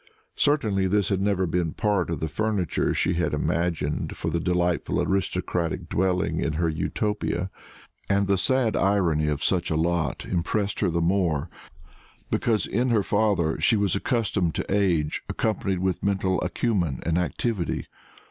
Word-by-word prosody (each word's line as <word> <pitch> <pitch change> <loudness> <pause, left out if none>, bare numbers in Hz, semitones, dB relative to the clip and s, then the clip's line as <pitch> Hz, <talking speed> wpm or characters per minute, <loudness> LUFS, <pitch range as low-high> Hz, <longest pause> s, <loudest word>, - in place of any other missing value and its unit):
Certainly 110 -10 +2
this 100 -1 +1
had 95 -1 0
never 100 -2 +1
been 85 -1 -1
part 100 -5 0
of 85 - -3
the 80 - 0
furniture 105 +1 0
she 90 - +1
had 90 +1 0
imagined 85 -3 -1
for - - -2
the 85 - 0
delightful 90 0 0
aristocratic 90 -3 -1
dwelling 90 -3 0
in 80 - -1
her 85 +2 0
Utopia; 95 +2 -2 0.6
and 100 0 +3
the 100 0 +2
sad 115 +4 +1
irony 90 -6 +2
of 75 -1 -1
such 90 -2 +1
a 80 - 0
lot 80 -3 0
impressed 100 +3 -1
her - - +2
the 85 0 0
more 85 -3 +1 0.8
because 110 -3 +1
in 120 +5 0
her 110 -4 +3
father 100 -8 +1
she 110 +7 +4
was 100 -3 +1
accustomed 100 - 0
to 95 - -1
age 85 -7 +1
accompanied 100 -3 -1
with 95 -2 0
mental 95 -2 0
acumen 90 - 0
and 85 +1 +1
activity. 90 +1 -2
90 Hz, 155 wpm, -25 LUFS, 85-100 Hz, 0.8 s, she